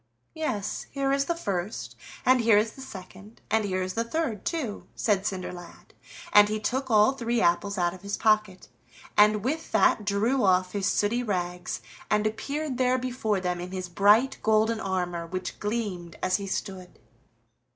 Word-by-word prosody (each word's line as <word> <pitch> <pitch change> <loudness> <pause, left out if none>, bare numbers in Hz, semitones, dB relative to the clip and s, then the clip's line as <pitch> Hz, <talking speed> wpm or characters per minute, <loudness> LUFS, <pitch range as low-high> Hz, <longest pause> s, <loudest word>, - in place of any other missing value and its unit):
"Yes, 220 -11 -3
here 275 -1 -1
is 275 0 +2
the 340 - -1
first, 200 - -4 0.3
and 255 -1 +5
here 225 -2 +5
is 215 +1 +2
the 265 - -13
second, 200 -2 -11
and 220 0 +3
here 185 -2 -1
is 185 0 -4
the 230 - 0
third, 235 - -3
too," 275 -12 -3
said 200 -3 +1
Cinderlad, 180 -2 -7 0.4
and 210 0 +8
he 215 0 -1
took 260 +5 -2
all 215 +1 +5
three 240 -3 -1
apples 200 +1 +1
out 175 -1 +1
of 185 - -12
his 200 0 -3
pocket, 215 -4 +1 0.5
and 210 0 +5
with 315 +5 -2
that 215 - +4
drew 215 +6 +1
off 185 -1 +3
his 200 -1 -1
sooty 225 +4 +1
rags, 180 -5 -3 0.3
and 210 0 +2
appeared 275 +5 -3
there 255 0 +3
before 245 -5 -1
them 180 -1 -2
in 180 +1 -7
his 185 -1 -5
bright 210 +9 +4
golden 220 +1 +2
armor, 180 -4 -2
which 185 +2 -5
gleamed 205 -6 -3
as 185 0 +2
he 200 - -6
stood. 190 -1 -5
210 Hz, 170 wpm, -27 LUFS, 185-235 Hz, 0.5 s, and